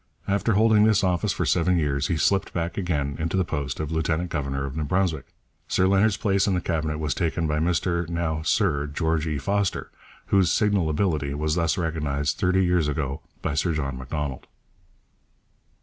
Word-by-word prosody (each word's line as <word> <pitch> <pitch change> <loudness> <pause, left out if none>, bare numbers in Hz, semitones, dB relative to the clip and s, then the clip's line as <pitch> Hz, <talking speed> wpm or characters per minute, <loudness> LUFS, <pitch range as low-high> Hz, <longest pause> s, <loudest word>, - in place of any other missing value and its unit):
After 100 +3 +1
holding 110 +1 +5
this 105 -2 +3
office 90 -3 +1
for - - -1
seven 90 +1 +2
years, 70 -3 0
he 85 - 0
slipped 95 +6 +1
back 85 0 -2
again 75 -7 -2
into 85 +3 -1
the 95 - +2
post 70 -5 -3
of 80 0 -3
lieutenant 80 +2 -1
governor 70 -3 -2
of 70 0 -6
New 80 - -2
Brunswick. 85 -1 0 0.4
Sir 95 - +2
Leonard's 100 +2 +3
place 100 -2 +1
in 95 - +2
the - - +1
Cabinet 80 -3 -2
was 75 -3 -1
taken 85 0 -1
by 75 0 0
Mr 85 0 0
(now 85 -2 -1
Sir) 80 -4 +1
George 80 +1 -1
E. 75 -2 -1
Foster, 100 +6 -1 0.4
whose 95 -4 +4
signal 100 -6 +2
ability 75 -4 0
was 75 +1 -1
thus 85 +1 +1
recognized 75 -4 -1
thirty 95 -1 +2
years 90 -3 +2
ago 70 0 -2 0.2
by - - -1
Sir 80 +3 0
John 70 -3 -2
Macdonald. 65 +1 -5
80 Hz, 180 wpm, -25 LUFS, 75-95 Hz, 0.4 s, holding